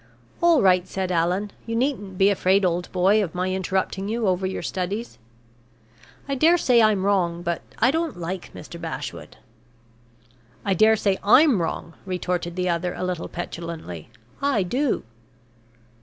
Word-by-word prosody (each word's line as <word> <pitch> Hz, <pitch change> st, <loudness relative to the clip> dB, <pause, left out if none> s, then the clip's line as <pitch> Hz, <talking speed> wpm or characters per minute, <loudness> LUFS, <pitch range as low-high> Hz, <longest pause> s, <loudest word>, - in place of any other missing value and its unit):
"All 340 Hz, -6 st, +5 dB
right," 185 Hz, -1 st, +4 dB
said 190 Hz, -1 st, -3 dB
Allan. 180 Hz, +4 st, 0 dB, 0.2 s
"You 230 Hz, -, -2 dB
needn't 230 Hz, -7 st, -1 dB
be 195 Hz, +2 st, +5 dB
afraid, 190 Hz, 0 st, +2 dB
old 175 Hz, 0 st, -1 dB
boy, 195 Hz, +4 st, +3 dB
of 175 Hz, -4 st, -6 dB
my 185 Hz, +1 st, -1 dB
interrupting 190 Hz, +1 st, -2 dB
you 225 Hz, -1 st, -1 dB
over 185 Hz, 0 st, +1 dB
your 190 Hz, -, -4 dB
studies. 200 Hz, +6 st, -4 dB, 1.1 s
I 275 Hz, -, -2 dB
dare 320 Hz, +6 st, +4 dB
say 245 Hz, -7 st, +4 dB
I'm 210 Hz, -3 st, +3 dB
wrong 175 Hz, -4 st, +1 dB
but 170 Hz, -1 st, -2 dB, 0.2 s
I 240 Hz, +4 st, +4 dB
don't 325 Hz, -, -2 dB
like 175 Hz, +2 st, -5 dB
Mr. 170 Hz, -, -9 dB
Bashwood." 165 Hz, -2 st, -6 dB, 1.3 s
"I 195 Hz, -, +2 dB
dare 215 Hz, +4 st, +5 dB
say 200 Hz, -3 st, 0 dB
I'm 245 Hz, -, +5 dB
wrong," 165 Hz, 0 st, -4 dB
retorted 180 Hz, -1 st, -2 dB
the 180 Hz, 0 st, -1 dB
other, 175 Hz, +1 st, -1 dB
a -, -, -4 dB
little 180 Hz, -2 st, -3 dB
petulantly. 165 Hz, -, -7 dB, 0.3 s
"I 275 Hz, -8 st, +2 dB
do." 250 Hz, +8 st, 0 dB
190 Hz, 155 wpm, -24 LUFS, 180-220 Hz, 1.3 s, All